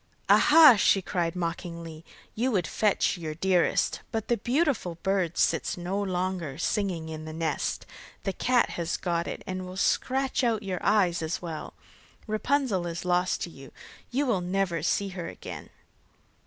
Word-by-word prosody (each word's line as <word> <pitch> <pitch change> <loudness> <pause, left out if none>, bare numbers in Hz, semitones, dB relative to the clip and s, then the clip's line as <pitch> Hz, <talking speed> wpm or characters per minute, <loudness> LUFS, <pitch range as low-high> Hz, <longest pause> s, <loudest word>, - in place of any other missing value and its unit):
'Aha!' 300 -5 +8
she 195 - +4
cried 175 -2 -2
mockingly, 170 -2 -5 0.3
'you 245 +4 0
would 185 -6 +1
fetch 205 0 +1
your 155 -2 -5
dearest, 180 0 +1
but 220 -1 -3
the 240 - +3
beautiful 245 - 0
bird 190 -4 0
sits - - +1
no 185 +3 -2
longer 180 -6 -2
singing 175 -2 -1
in 155 -1 -7
the 155 - -6
nest; 160 -2 -2 0.4
the 195 0 -1
cat 245 +3 +2
has 170 -1 -2
got 170 -2 -1
it, - - -6
and 185 0 -4
will 185 +1 -8
scratch 265 +6 +1
out 225 -3 +1
your 185 -2 -4
eyes 185 -6 +3
as 160 +1 -2
well. 165 -3 -7 0.5
Rapunzel 215 -4 0
is 170 +1 -5
lost 180 +1 +1
to 175 - -4
you; 135 -3 -13 0.4
you 275 +4 0
will 220 -8 +1
never 180 -2 -1
see 195 +5 0
her 180 -3 -6
again. - - -8
185 Hz, 160 wpm, -27 LUFS, 170-210 Hz, 0.5 s, Aha